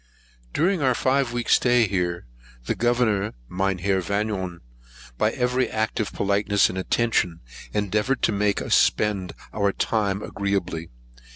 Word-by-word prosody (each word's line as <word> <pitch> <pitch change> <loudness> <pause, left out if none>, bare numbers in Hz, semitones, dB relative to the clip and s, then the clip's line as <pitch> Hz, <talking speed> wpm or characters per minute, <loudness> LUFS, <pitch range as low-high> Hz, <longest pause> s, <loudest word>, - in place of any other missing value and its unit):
During 175 +2 +1
our 130 -3 +3
five 130 -1 +1
weeks 120 -1 +3
stay 120 -2 +3
here, 90 -5 -2 0.4
the - - 0
Governor, 110 -4 +1
Mynheer 95 +2 0
Vanion, 95 -2 -2 0.6
by - - +3
every 125 +1 0
act 110 0 -1
of 110 - -1
politeness 100 0 +2
and 90 - -5
attention 95 -5 0 0.3
endeavoured 105 +5 0
to - - +3
make 100 -1 0
us - - -1
spend 100 -4 +2 0.2
our 100 -2 +1
time 100 -1 -1
agreeably. 95 -4 -2
105 Hz, 130 wpm, -24 LUFS, 95-120 Hz, 0.6 s, our